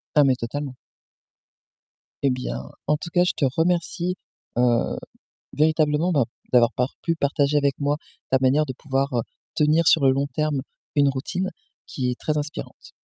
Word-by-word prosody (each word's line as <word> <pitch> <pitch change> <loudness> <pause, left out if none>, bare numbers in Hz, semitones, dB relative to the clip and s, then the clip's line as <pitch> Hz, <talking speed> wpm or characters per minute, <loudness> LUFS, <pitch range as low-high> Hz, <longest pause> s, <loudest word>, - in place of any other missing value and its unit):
Ah, 150 - +7
mais 130 -2 +4
totalement. 135 +3 -4 1.5
Et 140 - +5
bien, 65 - -4 0.2
en 150 - +4
tout 160 +3 -6
cas, 180 0 +4
je 180 - +1
te - - -2
remercie, 175 +1 +1 0.4
heu, 120 -1 +2 0.6
véritablement, 155 +2 +2
bah, 140 -7 +3 0.3
d'avoir 120 -1 +6
par 125 +2 -1
pu 165 - 0
partager 145 -1 +1
avec 140 -1 +2
moi 145 +1 +1 0.3
ta 130 - +4
manière 140 +4 +3
de 130 - -3
pouvoir, 135 +1 -1
heu, - - +2 0.3
tenir 155 +2 +3
sur 150 -4 +5
le 130 - +6
long 140 +1 0
terme 150 -3 0 0.3
une 140 -1 +5
routine 180 +8 -2 0.4
qui 125 -2 -2
est 125 - -6
très 155 -1 -1
inspirante. 150 +1 -6
145 Hz, 165 wpm, -24 LUFS, 130-155 Hz, 1.5 s, Ah